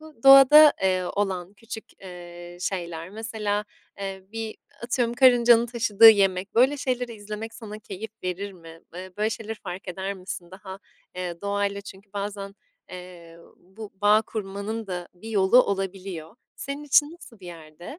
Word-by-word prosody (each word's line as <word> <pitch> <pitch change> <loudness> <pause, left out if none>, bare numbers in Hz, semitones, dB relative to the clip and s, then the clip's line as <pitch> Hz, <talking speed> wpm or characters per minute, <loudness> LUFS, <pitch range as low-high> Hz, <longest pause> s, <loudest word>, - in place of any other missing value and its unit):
bu 310 -7 -16
doğada, 275 +3 +9
eee, 185 -1 +1
olan 190 -2 -2
küçük, 225 +1 -9 0.2
eee, 175 -1 -11
şeyler, 170 -2 -4
mesela, 215 -1 -3 0.3
eee, 195 -1 -6
bir 225 -1 -5 0.3
atıyorum 235 0 -1
karıncanın 240 -2 +5
taşıdığı 225 -2 +6
yemek, 195 -2 +1
böyle 260 +5 +4
şeyleri 250 -3 -3
izlemek 215 +2 -8
sana 215 -2 -9
keyif 205 +1 -8
verir 195 +2 -4
mi? 165 -2 -14
Iıı, 185 +1 -9
böyle 215 +1 0
şeyleri 225 0 -5
fark 185 -3 -9
eder 190 +2 -4
misin? 180 -2 -8
Daha, 190 0 -10 0.4
eee, 180 -2 -5
doğayla 200 0 -2
çünkü 200 0 -14
bazen, 200 -1 -5 0.4
eee, 180 -2 -11 0.2
bu 200 +4 -12
bağ 210 +1 +5
kurmanın 210 +1 -5
da 180 -2 -5
bir 185 +5 -11
yolu 210 +4 +5
olabiliyor. 195 -2 -5 0.2
Senin 280 +1 -6
için 295 +2 +3
nasıl 235 - -15
bir 180 - -12
yerde? 170 - -11
200 Hz, 150 wpm, -25 LUFS, 185-225 Hz, 0.4 s, doğada